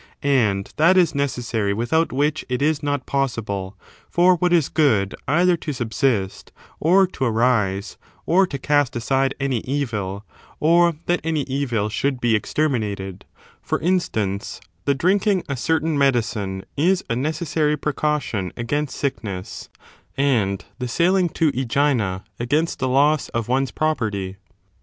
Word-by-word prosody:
And 110 -9 +1
that 170 +5 +5
is 175 -4 +4
necessary 120 -7 -1
without 160 +9 +1
which 145 +3 0
it 125 -1 -1
is 155 0 +1
not 145 -2 -2
possible 105 -8 -2 0.3
for 180 +1 +4
what 180 +1 +1
is 170 -5 +3
good 110 - +2
either 175 +5 +3
to 155 -2 -4
subsist, 120 -5 -1 0.3
or 185 +5 +5
to 140 -7 -3
arise, 110 -4 +1 0.3
or 190 +3 +4
to 140 - -4
cast 145 -1 +1
aside 135 +3 0
any 135 -4 0
evil, 110 -7 -3 0.3
or 170 +1 +4
that 175 0 +1
any 160 -2 0
evil 130 -6 -1
should 130 +5 -1
be 120 -2 +2
exterminated; 105 -8 -2 0.4
for - - -2
instance, 110 - -1 0.3
the 140 - +2
drinking 190 +5 +2
a 140 - -2
certain 160 +4 0
medicine 110 -8 0
is 180 +6 +2
a 115 - -1
necessary 150 +2 0
precaution 145 -10 -1
against 145 +5 -2
sickness, 100 -9 -4 0.5
and 115 -9 +1
the 125 - -2
sailing 175 +7 +2
to 160 -1 +1
iEgina,^ 120 -7 0 0.2
against 150 +8 0
the 130 - 0
loss 145 +3 +3
of 115 -1 -3
one's 130 +1 +1
property. 105 -11 -2
135 Hz, 140 wpm, -22 LUFS, 110-155 Hz, 0.5 s, that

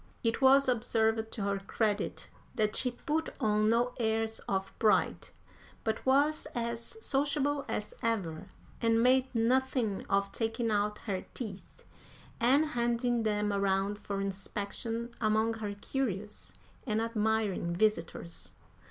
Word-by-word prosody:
It 230 +3 0
was 270 +1 +6
observed, 225 -2 +1
to 210 - -3
her 200 0 0
credit, 205 +1 -1 0.3
that 215 -1 +1
she 255 - +1
put 310 +6 -2
on 215 0 +2
no 240 +2 +2
airs 225 -1 0
of 195 0 -1
pride, 215 -2 +2 0.6
but 220 0 -1
was 290 +4 +3
as 235 - -3
sociable 285 0 +1
as - - -3
ever, 190 -6 -1 0.3
and 230 0 +3
made 260 +1 +5
nothing 240 -2 +1
of 200 0 +1
taking 225 0 -1
out 210 0 +1
her 190 -4 -2
teeth 210 -6 -8 0.5
and 265 +6 +4
handing 240 -3 0
them 210 -1 0
around 200 +1 +1
for 200 -1 -4
inspection 205 +4 -3
among 220 +1 +2
her 210 -2 -4
curious 210 -3 -4 0.3
and 215 -1 +1
admiring 220 -5 0
visitors. 175 -4 -1
225 Hz, 125 wpm, -31 LUFS, 205-240 Hz, 0.6 s, was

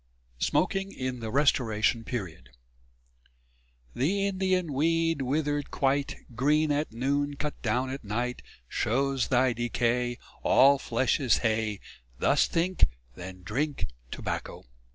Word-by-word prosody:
V - - +1
SMOKING 195 0 0
IN 130 -1 -3
THE 115 -1 -4
RESTORATION 115 -4 +2
PERIOD 90 - -5 1.4
The 195 +10 +1
Indian 185 -4 0
weed 165 +2 +1
withered 145 +2 -1
quite 140 +1 0 0.2
Green 150 +5 +2
at 145 +2 0
noon, 140 +5 0
cut 150 +1 -5
down 125 +3 0
at 135 0 -6
night, 120 +4 -2 0.3
Shows 135 - 0
thy 130 -1 +3
decay 120 +1 0 0.2
All 140 +1 +6
flesh 125 +3 +1
is 130 -7 +3
hay: 110 -2 0 0.4
Thus - - +3
think, 180 +2 +2 0.3
then 90 +3 -9
drink 135 - -2 0.2
tobacco. - - -5
130 Hz, 120 wpm, -28 LUFS, 115-150 Hz, 1.4 s, All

